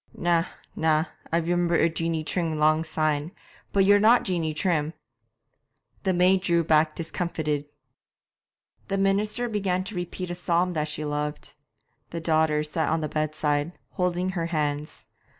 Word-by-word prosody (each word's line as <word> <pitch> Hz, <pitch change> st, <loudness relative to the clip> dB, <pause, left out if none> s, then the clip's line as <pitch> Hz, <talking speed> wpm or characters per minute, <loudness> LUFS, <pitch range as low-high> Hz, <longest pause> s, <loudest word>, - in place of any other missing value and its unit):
'Na, 170 Hz, -1 st, +2 dB, 0.3 s
na, 160 Hz, 0 st, +2 dB, 0.3 s
I 165 Hz, -, +3 dB
remember 175 Hz, +1 st, +1 dB
a 165 Hz, -, +4 dB
Jeanie 165 Hz, -1 st, -1 dB
Trim 165 Hz, -1 st, -1 dB
long 155 Hz, +1 st, +3 dB
syne, 155 Hz, -1 st, -1 dB, 0.4 s
but 195 Hz, -1 st, +3 dB
you're 205 Hz, +1 st, +6 dB
not 225 Hz, +4 st, +5 dB
Jeanie 170 Hz, -4 st, -1 dB
Trim!' 155 Hz, -1 st, 0 dB, 1.1 s
The 190 Hz, -, +1 dB
maid 185 Hz, +1 st, +4 dB
drew 170 Hz, -2 st, +2 dB
back 155 Hz, 0 st, +3 dB
discomfited. 160 Hz, -3 st, -2 dB, 1.2 s
The 195 Hz, -, -1 dB
minister 210 Hz, +4 st, +1 dB
began 195 Hz, -4 st, -1 dB
to 195 Hz, +2 st, -7 dB
repeat 175 Hz, 0 st, -4 dB
a -, -, -3 dB
psalm 175 Hz, 0 st, +1 dB
that 155 Hz, -3 st, -1 dB
she 150 Hz, 0 st, -4 dB
loved. 150 Hz, 0 st, -3 dB, 0.6 s
The 170 Hz, -, -4 dB
daughters 155 Hz, -2 st, +1 dB
sat 160 Hz, -2 st, 0 dB
on 160 Hz, 0 st, +1 dB
the 155 Hz, -, -2 dB
bedside, 155 Hz, +1 st, -1 dB
holding 180 Hz, 0 st, 0 dB
her 170 Hz, -3 st, -2 dB
hands. 150 Hz, -2 st, -2 dB
165 Hz, 150 wpm, -26 LUFS, 155-180 Hz, 1.2 s, you're